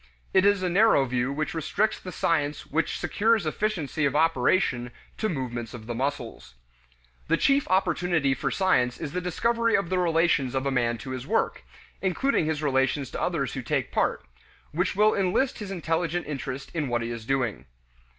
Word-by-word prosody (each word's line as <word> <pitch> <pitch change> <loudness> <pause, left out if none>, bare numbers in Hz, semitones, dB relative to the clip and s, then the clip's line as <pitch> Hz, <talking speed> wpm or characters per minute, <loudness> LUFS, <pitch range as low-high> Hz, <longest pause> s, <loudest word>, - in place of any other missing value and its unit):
It 190 +1 +5
is 205 -2 +3
a - - +1
narrow 180 -6 +4
view 125 +1 -1
which 155 +2 -2
restricts 200 +7 0
the 185 - -8
science 150 -3 0
which 155 +1 -1
secures 220 -2 +2
efficiency 160 -3 -1
of 140 0 +1
operation 150 -4 +2 0.3
to 220 - 0
movements 120 -6 -4
of 110 -2 -10
the 120 - -4
muscles. 125 - -4 0.7
The - - +2
chief 275 0 +2
opportunity 175 -5 +2
for 130 - -2
science 125 -11 +2
is 150 -3 -4
the 180 - -2
discovery 230 +6 +1
of 195 -4 0
the 185 - +2
relations 165 -6 +2
of 130 +1 -1
a 140 - +1
man 120 -2 +1
to 120 +4 -8
his 130 +1 -5
work 225 - 0 0.4
including 190 - +1
his 155 -1 -2
relations 135 0 +1
to - - -4
others - - -1
who - - -3
take - - -1
part - - 0 0.5
which 180 +5 0
will 215 +2 +4
enlist 200 +8 +1
his 205 -3 -6
intelligent 170 -1 -1
interest 140 -2 -5
in 155 -4 -1
what 120 -1 -1
he 115 - -4
is 115 -1 -6
doing. 115 - -1
155 Hz, 180 wpm, -26 LUFS, 130-185 Hz, 0.7 s, It